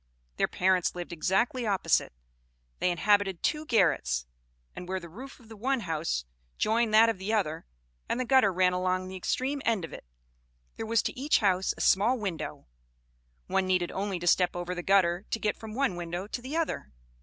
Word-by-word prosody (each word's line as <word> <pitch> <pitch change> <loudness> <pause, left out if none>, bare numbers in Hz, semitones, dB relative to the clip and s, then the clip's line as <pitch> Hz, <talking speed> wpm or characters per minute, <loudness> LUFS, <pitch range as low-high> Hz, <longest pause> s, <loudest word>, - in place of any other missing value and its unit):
Their - - +2
parents 185 -1 +1
lived 175 -1 -6
exactly 220 +8 0
opposite. 195 -2 +1 0.7
They - - +2
inhabited 195 0 +2
two 305 0 0
garrets; 150 - +2 0.5
and 180 - -8
where 190 0 -1
the 170 - -10
roof 255 +13 -11
of 235 - -18
the 225 - -11
one 255 +4 0
house 160 - -2 0.3
joined 225 +1 +1
that 225 +1 +8
of 225 -4 -1
the 195 +3 -3
other, 160 - -1 0.4
and 240 - 0
the 255 - 0
gutter 260 -5 +4
ran 180 0 +2
along 185 0 -1
the 190 - -7
extreme 265 +9 -2
end 220 -7 +1
of - - -12
it, - - -9 0.7
there 225 - -5
was 230 0 +2
to - - -2
each 280 +4 +2
house 190 -2 +1
a - - -5
small 220 +7 +4
window: 195 -7 -5 0.8
one 190 -1 0
needed 180 -2 +1
only 195 -1 -2
to 175 - -6
step 175 +1 +3
over 175 0 -3
the 175 - -4
gutter 185 0 +2
to 225 - -1
get 210 -1 0
from 220 -1 -8
one 270 -8 +1
window 175 +2 -4
to 230 +4 -5
the 270 +6 -4
other. 315 - -2
195 Hz, 195 wpm, -29 LUFS, 180-230 Hz, 0.8 s, that